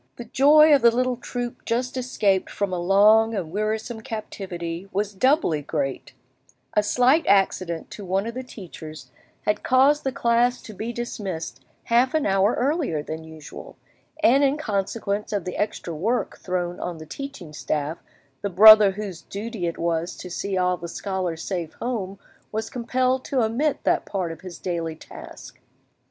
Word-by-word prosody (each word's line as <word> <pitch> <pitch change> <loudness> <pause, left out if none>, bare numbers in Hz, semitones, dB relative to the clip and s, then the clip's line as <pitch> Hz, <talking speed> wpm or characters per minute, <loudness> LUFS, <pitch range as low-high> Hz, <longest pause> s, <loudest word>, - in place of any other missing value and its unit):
The 240 - -8
joy 295 +5 +6
of 280 - +5
the 235 - +7
little 250 +2 0
troop 245 0 -6
just 245 +2 -2
escaped 210 -7 0
from 200 -2 -2
a 180 - -1
long 210 +5 +5
and 175 -6 -4
wearisome 220 +3 -2
captivity 190 -6 -6
was 205 +2 -2
doubly 255 - +2
great: 140 -2 -3 0.6
a 210 - +4
slight 250 +9 +3
accident 185 -4 +1
to 205 - -8
one 190 +2 -1
of 230 - -4
the 255 - -4
teachers 170 -10 -10 0.3
had 210 - 0
caused 275 +3 +4
the 270 - -1
class 240 0 +2
to 215 - -10
be 220 +4 -4
dismissed 205 -8 -5 0.2
half 245 +4 +2
an 310 - +1
hour 195 +2 +3
earlier 270 - 0
than 160 +1 -6
usual, 160 -1 -11 0.5
and 275 +1 +5
in 280 +1 +2
consequence 205 -4 -2
of 205 -4 -2
the 180 - -4
extra 205 -4 -3
work 220 +11 -1
thrown 180 -1 -3
on 175 -2 -4
the 155 - -9
teaching 240 - -8
staff 150 +3 -3 0.4
the 200 - -2
brother 210 +1 +9
whose 195 -4 -6
duty 210 -3 -5
it 170 - -4
was 170 0 -1
to 180 - -9
see 195 +2 -2
all 180 0 +1
the 170 - -7
scholars 180 -2 -3
safe 175 -5 -4
home 205 -6 -4 0.3
was 220 +1 -3
compelled 255 +1 0
to 260 -4 0
omit 260 +7 0
that - - +1
part 185 -4 -2
of 165 - -10
his 180 -3 -9
daily 165 -3 -3
task. - - -12
205 Hz, 170 wpm, -24 LUFS, 175-240 Hz, 0.6 s, brother